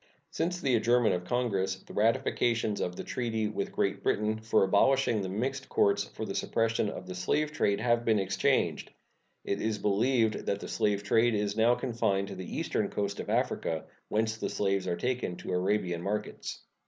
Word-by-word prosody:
Since 175 Hz, +2 st, -2 dB
the 135 Hz, -, +1 dB
adjournment 120 Hz, +1 st, +3 dB
of 90 Hz, 0 st, -3 dB
Congress 100 Hz, -4 st, 0 dB
the 95 Hz, -, -14 dB
ratifications 115 Hz, -1 st, +1 dB
of 90 Hz, -, -2 dB
the -, -, -5 dB
treaty 110 Hz, -3 st, -1 dB
with 105 Hz, -2 st, -3 dB
Great -, -, -1 dB
Britain 105 Hz, +1 st, 0 dB
for 110 Hz, -1 st, +2 dB
abolishing 115 Hz, +3 st, +3 dB
the 95 Hz, -, -3 dB
mixed 130 Hz, +7 st, -3 dB
courts 100 Hz, 0 st, +2 dB
for 110 Hz, -, -6 dB
the 95 Hz, -, -4 dB
suppression 115 Hz, -1 st, 0 dB
of 90 Hz, -, -7 dB
the 90 Hz, -, -6 dB
slave 150 Hz, +12 st, 0 dB
trade 100 Hz, -10 st, +1 dB
have 120 Hz, -1 st, +2 dB
been 110 Hz, -2 st, +3 dB
exchanged. 95 Hz, 0 st, +1 dB, 0.5 s
It 100 Hz, -, -2 dB
is 110 Hz, -1 st, 0 dB
believed 110 Hz, +3 st, +1 dB
that 100 Hz, -, 0 dB
the -, -, -7 dB
slave 100 Hz, -1 st, 0 dB
trade 115 Hz, +3 st, +3 dB
is 105 Hz, 0 st, -1 dB
now 115 Hz, +2 st, +4 dB
confined 115 Hz, -6 st, -1 dB
to 100 Hz, -, -6 dB
the 95 Hz, -1 st, -6 dB
eastern -, -, -1 dB
coast 100 Hz, -1 st, -2 dB
of -, -, -5 dB
Africa, 80 Hz, -1 st, 0 dB, 0.2 s
whence 110 Hz, +1 st, 0 dB
the -, -, -3 dB
slaves 100 Hz, -2 st, 0 dB
are 85 Hz, -1 st, -1 dB
taken 125 Hz, -7 st, -2 dB
to 90 Hz, -, -5 dB
Arabian 90 Hz, -2 st, 0 dB
markets. 105 Hz, +3 st, -4 dB
105 Hz, 185 wpm, -30 LUFS, 100-120 Hz, 0.5 s, now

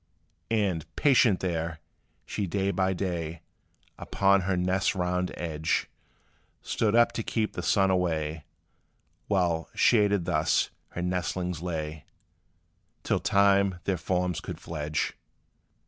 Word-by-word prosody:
And, 100 Hz, -8 st, +1 dB
patient 125 Hz, -8 st, +4 dB
there, 85 Hz, -3 st, -2 dB, 0.5 s
she 100 Hz, -, -3 dB
day 100 Hz, +2 st, 0 dB
by 95 Hz, -1 st, +1 dB
day, 85 Hz, -3 st, -3 dB, 0.6 s
Upon 100 Hz, 0 st, +3 dB
her 95 Hz, 0 st, 0 dB
nest's 90 Hz, +3 st, +1 dB
round 90 Hz, 0 st, -1 dB
edge, 80 Hz, -1 st, -1 dB, 0.7 s
Stood 110 Hz, -1 st, 0 dB
up 120 Hz, 0 st, +5 dB
to -, -, -3 dB
keep 110 Hz, -1 st, -1 dB
the -, -, -4 dB
sun 95 Hz, -2 st, +3 dB
away, 80 Hz, -4 st, -1 dB, 0.8 s
While, 85 Hz, -5 st, +1 dB
shaded 100 Hz, -5 st, +3 dB
thus, -, -, +1 dB, 0.2 s
her 90 Hz, -, -3 dB
nestlings 90 Hz, -1 st, -2 dB
lay 80 Hz, -3 st, -4 dB, 1.0 s
Till -, -, +1 dB
time 100 Hz, -1 st, +3 dB
their 95 Hz, -, 0 dB
forms 90 Hz, 0 st, -1 dB
could -, -, -7 dB
fledge. 75 Hz, -1 st, -3 dB
90 Hz, 115 wpm, -28 LUFS, 85-100 Hz, 1.0 s, up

